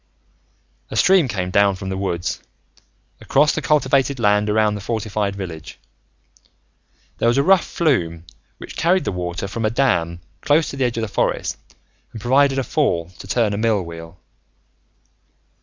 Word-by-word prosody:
A - - -6
stream 185 -6 +4
came 95 -5 -3
down 100 0 +3
from 95 0 -6
the 95 - -3
woods, 90 -3 -3 0.8
across 150 +2 +2
the - - -2
cultivated 140 -2 +1
land 105 -1 +2
around 105 0 +2
the 105 - -5
fortified 105 -2 -2
village. 85 -5 -8 1.4
There - - +2
was 120 +2 +3
a 140 - +3
rough 190 +1 +5
flume 85 - -1 0.3
which - - -10
carried 180 +3 +2
the - - -2
water 90 +1 -4
from 115 +4 -5
a 110 - +2
dam 90 -9 0 0.2
close 150 +1 +2
to - - -7
the 135 -1 0
edge 120 -1 -2
of 115 - -1
the - - -2
forest - - -1 0.6
and 110 - -7
provided 135 +4 +3
a 135 - +1
fall 90 - -1
to - - -10
turn 110 0 +1
a - - -2
mill 110 -4 +1
wheel. 85 0 -10
110 Hz, 165 wpm, -20 LUFS, 95-135 Hz, 1.4 s, rough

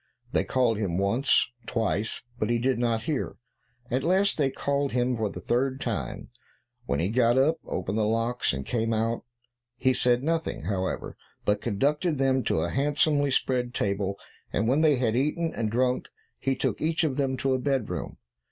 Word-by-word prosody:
They - - +2
called 120 -5 +1
him, 90 -5 -1
once, 115 +8 +3 0.2
twice, 110 -2 -1 0.2
but 110 - 0
he 120 - +2
did 125 +1 +1
not 115 -2 +1
hear; 145 +2 -2 0.6
at 130 +2 +1
last 190 +5 +3
they 140 -3 +2
called 140 +1 -1
him 125 0 +1
for 110 -2 -1
the 90 - -7
third 130 +7 0
time, - - -4 0.6
when - - 0
he 85 - +1
got 120 +1 +3
up, 150 +5 +4
opened 105 +4 -2
the 105 - +2
locks, 115 +2 +1
and 70 -1 -4
came 115 -1 0
out. 115 +1 -1 0.5
He 130 +2 +3
said 125 0 +2
nothing, 160 - -1
however, 95 +1 -2 0.3
but 105 0 +2
conducted 145 - 0
them 130 -1 +2
to - - +1
a - - -1
handsomely 145 +1 +2
spread 125 -2 0
table, 100 0 -1 0.3
and 110 +3 0
when 135 +5 +3
they 155 -3 +5
had 120 -3 0
eaten 150 +5 0
and 110 -2 -1
drunk, 125 +3 0 0.3
he 135 -1 0
took - - -1
each 160 +2 +1
of 145 -5 0
them 135 -2 0
to 135 0 +1
a 130 - +1
bedroom. 135 -4 -2
125 Hz, 180 wpm, -27 LUFS, 110-140 Hz, 0.6 s, they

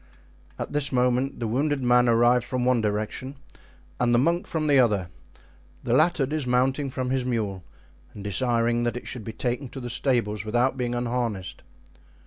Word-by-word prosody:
At - - -5
this 145 -1 +2
moment 125 +1 +1
the 115 - -2
wounded 135 +4 0
man 125 0 +4
arrived 120 +1 +4
from 125 0 -2
one 125 -2 +3
direction 110 +6 -3 0.6
and 120 -1 +3
the - - +5
monk 170 +8 +1
from 160 -2 -2
the 145 -3 +4
other, 105 -8 +2 0.7
the - - 0
latter 160 -5 +3
dismounting 135 -1 0
from 130 -1 -3
his 130 -1 0
mule 105 -7 -2 0.5
and 100 - -8
desiring 115 +3 +1
that 120 0 -1
it - - -8
should 125 -4 -5
be 115 - -6
taken 125 +3 -3
to 135 - -8
the 120 -2 -5
stables 115 -5 0
without 120 +5 +1
being 120 -2 -2
unharnessed. 115 -7 -3
125 Hz, 170 wpm, -25 LUFS, 115-130 Hz, 0.7 s, the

